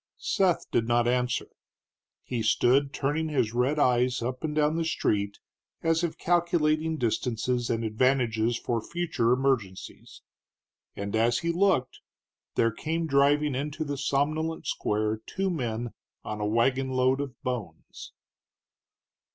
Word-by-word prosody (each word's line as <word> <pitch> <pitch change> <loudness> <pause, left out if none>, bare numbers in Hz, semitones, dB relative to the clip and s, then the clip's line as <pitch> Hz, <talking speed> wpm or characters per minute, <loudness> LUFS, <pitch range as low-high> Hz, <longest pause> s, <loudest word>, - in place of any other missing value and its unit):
Seth 185 -3 +1
did 115 -1 +1
not 120 0 +2
answer. 125 0 0 0.8
He 120 -3 -3
stood 130 +5 +3
turning 150 +3 -1
his 120 -7 0
red 125 +5 +1
eyes 125 -3 +2
up 125 +1 -4
and 150 -1 -2
down 150 +1 +2
the 165 - 0
street, 100 -10 -1 0.5
as 165 +1 +2
if 170 - -2
calculating 160 -2 +1
distances 120 0 -1
and 115 0 0
advantages 115 0 +1
for 115 -2 -2
future 160 -7 -1
emergencies. 125 -8 -2 0.7
And 100 +1 -4
as 115 +2 +3
he 170 - +2
looked 175 -7 +1 0.6
there 115 - +3
came 165 +8 -2
driving 145 0 +3
into 145 +4 -3
the 145 -1 -3
somnolent 155 +4 -1
square 110 +1 -1
two 195 0 -1
men 120 -6 -3 0.3
on 105 0 -5
a 105 - 0
wagonload 130 +3 +2
of 135 -3 -7
bones. 110 -11 -6
130 Hz, 130 wpm, -27 LUFS, 115-155 Hz, 0.8 s, stood